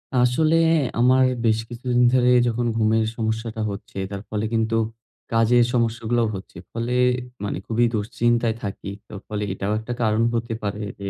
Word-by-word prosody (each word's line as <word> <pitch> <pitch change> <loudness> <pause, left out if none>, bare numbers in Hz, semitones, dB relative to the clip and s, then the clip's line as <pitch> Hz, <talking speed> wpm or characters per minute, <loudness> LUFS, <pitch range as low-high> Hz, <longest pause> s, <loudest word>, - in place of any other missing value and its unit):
আসলে 125 +6 +3 0.4
আমার 130 +2 +5 0.2
বেশ 110 0 +3
কিছুদিন 125 +1 0
ধরে 125 -1 +4 0.2
যখন 120 +1 -1
ঘুমের 110 0 +2
সমস্যাটা 110 0 -2
হচ্ছে, 100 0 -9
তার 100 0 -5
ফলে 105 0 -2
কিন্তু 110 0 +1 0.6
কাজের 115 +2 +4
সমস্যাগুলাও 115 0 +1
হচ্ছে। 95 - -10
ফলে 115 +2 -3 0.5
মানে 100 - -2
খুবই 120 +1 +2
দুশ্চিন্তায় 115 +1 +1
থাকি। 100 0 -5 0.2
তো - - -13
ফলে 105 -1 -3
এটাও 100 +2 -2
একটা 120 +2 -5
কারণ 110 0 +2
হতে 115 0 -2
পারে 105 +1 -3 0.2
যে 100 0 -4
115 Hz, 150 wpm, -23 LUFS, 110-120 Hz, 0.6 s, আমার